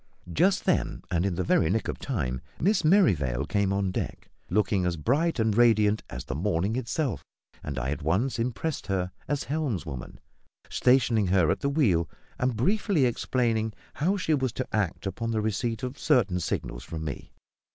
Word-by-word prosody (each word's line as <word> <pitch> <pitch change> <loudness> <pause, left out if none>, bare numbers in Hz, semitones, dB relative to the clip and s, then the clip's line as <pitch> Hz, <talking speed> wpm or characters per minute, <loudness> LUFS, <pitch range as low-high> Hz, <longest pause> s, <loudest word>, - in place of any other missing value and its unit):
Just 190 - +2
then, - - 0
and 90 +2 +1
in 90 - -1
the 95 - -1
very 85 -2 +3
nick 110 +4 0
of - - -4
time, 65 - -2 0.2
Miss 200 +2 +2
Merrivale 85 - +3
came 100 +3 +1
on 100 -1 0
deck, - - -5 0.2
looking 100 -1 +2
as 90 -1 0
bright 145 - +1
and 110 -3 +1
radiant 110 -3 +4
as 60 - -6
the - - -4
morning 95 +6 0
itself; 130 0 -2 0.4
and 70 -2 -5
I 65 0 -1
at 75 - -4
once 100 - 0
impressed 125 +1 -2
her 95 -2 -1 0.2
as 145 -1 -1
helmswoman, 100 - -3 0.5
stationing 120 -5 +3
her 90 -4 +3
at - - -1
the 140 - 0
wheel, 100 - +2 0.3
and 125 -1 +1
briefly 185 - +2
explaining 115 -2 0 0.2
how 185 +7 +1
she 160 -4 0
was 130 -4 +1
to 130 - -3
act 100 -4 -1
upon 105 +4 -3
the 110 -1 0
receipt 110 +2 -1
of 130 +2 -4
certain 100 -7 +2
signals - - -3
from 80 -1 -6
me. 70 - -6
110 Hz, 175 wpm, -27 LUFS, 90-130 Hz, 0.5 s, radiant